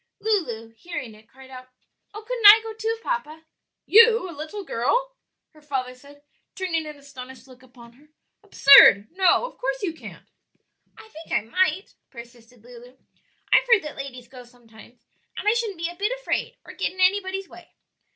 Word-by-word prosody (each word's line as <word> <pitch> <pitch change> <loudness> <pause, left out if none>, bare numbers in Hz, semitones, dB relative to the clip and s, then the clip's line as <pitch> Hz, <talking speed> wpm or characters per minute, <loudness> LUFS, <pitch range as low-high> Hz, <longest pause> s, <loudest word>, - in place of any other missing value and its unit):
Lulu, 240 - -3
hearing 340 -10 -7
it, 215 +1 -21
cried 265 +1 -17
out, 255 0 -11 0.4
"Oh, 425 +1 -10
couldn't 485 -4 +3
I 425 +2 +10
go 445 0 -7
too, 445 +1 -4
papa?" 320 -11 -5 0.4
"You? 455 -1 +5
a - - -9
little 320 +7 -8
girl?" 485 - -2 0.4
her 305 - -21
father 265 -4 -5
said, 285 +3 -19 0.3
turning 335 -5 -3
an 300 -1 -10
astonished 265 -2 -13
look 255 -1 -18
upon 245 -2 -18
her; 290 +5 -25 0.3
"absurd! 220 -7 +6
no, 375 +6 +2
of - - -12
course - - -4
you 345 -5 -2
can't." 325 - -13 0.7
"I 445 - -15
think 330 -5 -14
I - - +1
might," 370 - -1 0.2
persisted 235 -1 -15
Lulu; 245 +1 -15 0.6
"I've - - +4
heard 440 -5 +5
that 300 - -8
ladies 255 -3 -9
go 250 0 -13
sometimes, 240 -1 -20 0.3
and - - -6
I 425 - +4
shouldn't 455 -5 -3
be 335 0 -3
a 350 - -11
bit 410 +5 -2
afraid - - -4
or - - -12
get - - -3
in 375 - -17
anybody's 380 0 0
way." - - -17
305 Hz, 180 wpm, -23 LUFS, 250-405 Hz, 0.7 s, I